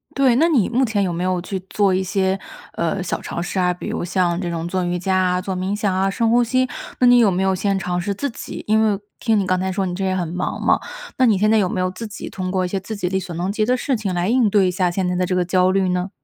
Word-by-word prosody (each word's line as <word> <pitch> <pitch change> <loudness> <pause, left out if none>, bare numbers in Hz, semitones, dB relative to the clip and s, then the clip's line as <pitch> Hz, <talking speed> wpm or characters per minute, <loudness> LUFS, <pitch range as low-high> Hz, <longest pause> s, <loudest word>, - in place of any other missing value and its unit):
对， 260 -3 +4
那 320 +6 +4
你 250 - +3
目 250 +3 +1
前 220 -5 +1
有 180 -2 -1
没 175 +2 -2
有 185 -1 0
去 190 +2 -4
做 200 -3 +2
一 190 - +1
些， 190 0 0 0.4
呃， 170 +3 -1
小 185 - -3
尝 - - -5
试 180 +2 -3
啊， 180 -1 +2
比 180 - -8
如 - - -3
像 175 -1 0
这 175 - -3
种 170 0 -3
做 185 +1 -1
瑜 175 0 -1
伽 190 +2 -1
啊、 180 -1 +2
做 190 0 -4
冥 185 +2 -2
想 205 -2 0
啊、 190 +1 +1
深 225 +3 0
呼 240 +1 +4
吸， 255 +2 +1 0.3
那 250 - +5
你 245 0 +7
有 225 -4 +5
没 185 +2 0
有 190 - +2
先 195 +1 0
尝 180 -2 -2
试 200 +3 -2
自 280 +8 -3
己 - - -8
因 220 +1 +3
为 205 -2 +1 0.2
听 225 -3 +2
你 195 - 0
刚 185 0 +1
才 190 +1 -1
说 195 0 -1
你 180 - -3
这 195 - -3
也 190 0 0
很 180 -2 -1
忙 180 +3 -3
嘛， - - +3 0.4
那 260 - +4
你 215 -5 +4
现 210 +2 +2
在 220 - +4
有 195 -4 +2
没 185 - -2
有 185 - +1
自 225 +5 -7
己 210 - -8
通 185 -1 -4
过 185 -1 0
一 - - -1
些 195 +1 -2
自 220 +4 -6
己 200 -3 -2
力 190 +1 0
所 185 -2 -7
能 180 +3 -2
及 215 +1 0
的 250 +3 +2
事 265 +1 0
情 210 -4 -3
来 175 0 0
应 240 -3 +3
对 195 -2 +3
一 - - +1
下 180 0 +1
现 180 +1 -1
在 180 - -1
的 180 0 +1
这 180 0 -1
个 180 - +1
焦 185 +1 +3
虑 190 -1 +1
呢？ 180 +1 -1
190 Hz, 335 characters per minute, -21 LUFS, 180-210 Hz, 0.4 s, 你